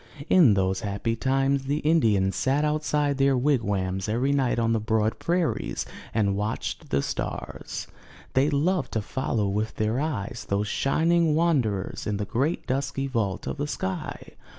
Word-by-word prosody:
In 150 - +6
those 95 0 +1
happy 100 +3 -2
times, 135 +2 +1
the 145 +2 0
Indians 110 - +2
sat 140 +7 +1
outside 150 -2 0
their 135 -1 +4
wigwams 100 -8 0
every 125 +6 +1
night 135 -4 +1
on 115 -1 +2
the 115 - +2
broad 110 0 0
prairies 175 -1 -1 0.3
and 100 -3 +1
watched 105 +2 -3
the 70 +1 +1
stars. - - -4 0.5
They 135 +3 +3
loved 155 +1 0
to 110 - 0
follow 115 -4 -1
with 105 +2 -2
their 110 +3 0
eyes 140 -10 -3
those 100 +1 0
shining 165 +5 +2
wanderers 130 - 0
in 105 -1 -1
the 105 - -2
great 140 - -1
dusky 135 0 -1
vault 110 -7 -2
of - - -4
the 145 +1 -2
sky. 95 -9 -4
125 Hz, 155 wpm, -26 LUFS, 105-145 Hz, 0.5 s, In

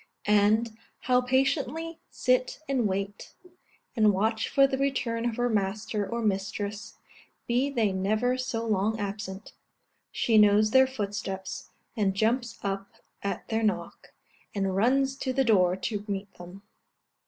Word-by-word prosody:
And, 210 +2 +3 0.3
how 250 -1 +3
patiently 280 +6 0
sit - - 0
and 260 -5 +1
wait, 195 +1 -4 0.6
and 215 -3 +5
watch 220 +3 0
for 275 - +5
the 270 -1 -1
return 240 -4 0
of 225 - -5
her 245 +1 +1
master 210 -1 -1
or 235 0 -2
mistress, 200 +1 -2 0.5
be 250 +4 +1
they 230 -7 +1
never 215 +6 +1
so 255 -3 -3
long 215 +1 0
absent! 200 0 -5 0.6
She 225 -2 +3
knows 210 +1 +5
their 260 +1 +6
footsteps, 205 -5 -5 0.3
and 200 -4 +1
jumps 235 +3 0
up 195 0 -3 0.3
at 200 - -4
their 225 0 0
knock, 215 -2 -2 0.4
and 195 -2 0
runs 265 +6 +2
to 260 -2 -2
the 270 +1 +2
door 185 -5 +4
to 205 +1 -3
meet 200 -1 -4
them. 180 +3 -12
220 Hz, 140 wpm, -28 LUFS, 200-250 Hz, 0.6 s, their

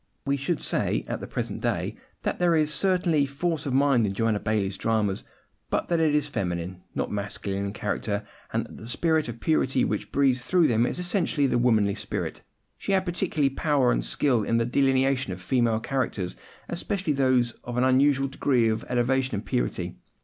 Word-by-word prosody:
We 140 0 +1
should 140 +4 -1
say, - - 0
at - - -3
the - - -7
present - - -3
day, - - -1 0.3
that - - -2
there 175 -2 +3
is 155 -1 +2
certainly 175 -7 +2
force 150 +2 -2
of 135 - -1
mind 135 -5 +4
in 95 - -3
Joanna 110 -1 +1
Baillie's 100 -3 -1
dramas, 105 -2 0 0.5
but - - -1
that 170 -1 +2
it 155 -2 +3
is 150 -1 +2
feminine, 90 -8 -3
not - - -2
masculine 100 -1 -3
in - - -4
character, 105 0 -2 0.3
and - - -1
that - - -12
the 110 - -10
spirit 160 +5 +1
of 115 0 -7
purity 135 -4 +2
which - - -3
breathes 135 -3 +2
through 170 +4 +3
them 115 +1 +2
is - - -3
essentially 175 -5 0
the 125 -2 +2
womanly 110 -5 +3
spirit. - - -4 0.4
She 200 - -1
had 190 -1 +2
particular 170 -6 0
power 140 -2 +2
and - - 0
skill 120 - +1
in 115 +2 +1
the 115 - +2
delineation 135 -2 +2
of 90 - -8
female 115 +2 +1
characters, 110 -7 -2 0.3
especially 175 -1 -1
those 130 -3 +2
of 120 0 -5
an 125 - +3
unusual 135 +1 +3
degree 130 -4 +2
of 110 +1 -1
elevation 125 0 +1
and 100 - -4
purity. - - -2
130 Hz, 190 wpm, -26 LUFS, 110-150 Hz, 0.5 s, mind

